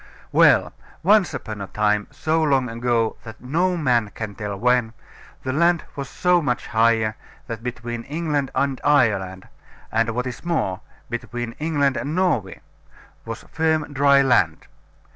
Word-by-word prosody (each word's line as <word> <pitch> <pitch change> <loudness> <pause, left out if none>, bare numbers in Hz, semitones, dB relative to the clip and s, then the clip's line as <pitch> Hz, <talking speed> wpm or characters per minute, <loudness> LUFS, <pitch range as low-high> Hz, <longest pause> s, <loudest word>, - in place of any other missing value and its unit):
Well, - - +5 0.3
once 200 +1 +4
upon 110 -7 -6
a 100 - -5
time, 105 0 0
so 160 +1 0
long 135 -5 +2
ago 115 -1 0
that 115 0 -11
no 175 +8 0
man 120 -8 +1
can 110 -2 -5
tell 105 -1 -5
when, 120 0 +2 0.5
the 130 - -2
land 170 +2 +3
was 140 -2 -5
so 180 +2 +2
much 130 -3 -1
higher, 110 -1 +2 0.3
that 115 -1 -6
between 120 -1 -5
England 150 -2 -1
and 140 -2 0
Ireland, 100 -10 +2 0.4
and, 115 +1 +1
what 125 +1 -1
is 125 -2 -6
more, 155 - -1 0.3
between 120 0 -4
England 145 -4 +1
and 145 +3 -3
Norway, 165 - 0 0.6
was - - -7
firm 160 -1 0
dry 140 0 +5
land. 100 -12 +2
125 Hz, 145 wpm, -22 LUFS, 115-150 Hz, 0.6 s, Well